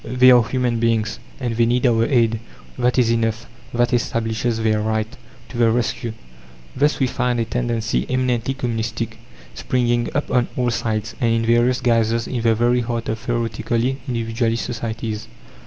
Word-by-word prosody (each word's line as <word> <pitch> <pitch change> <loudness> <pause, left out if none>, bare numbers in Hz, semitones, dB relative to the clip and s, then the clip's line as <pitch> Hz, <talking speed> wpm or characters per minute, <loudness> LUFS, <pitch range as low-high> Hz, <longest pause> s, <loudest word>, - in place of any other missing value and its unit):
"They 125 0 +5
are 125 -1 +7
human 125 0 -1
beings, 115 -1 0 0.2
and 120 -4 -2
they 115 0 +3
need 125 +2 +1
our 115 -2 +4
aid 115 -4 +2 0.4
that 125 0 +1
is 120 -2 +4
enough, 115 -1 0 0.3
that 120 +1 +1
establishes 115 -1 0
their 110 -1 +1
right 110 0 0 0.4
To 120 - -6
the 115 -1 +5
rescue!" 115 0 -1 0.6
Thus 145 +3 +2
we 135 - +3
find 125 -1 0
a 115 - +1
tendency, 115 -1 -1
eminently 130 0 0
communistic, 115 -3 -3 0.3
springing 120 - 0
up 145 - -1
on 120 -1 +2
all 125 -1 +1
sides, 110 -1 -2
and 115 -1 +3
in 115 0 +1
various 120 +2 +3
guises, 115 -1 +2
in 125 -3 -3
the 115 -1 +3
very 120 +2 +2
heart 115 -1 -3
of 110 0 -2
theoretically 115 +2 -1
individualist 115 -1 -1
societies. 115 -1 -4
115 Hz, 165 wpm, -21 LUFS, 115-125 Hz, 0.6 s, are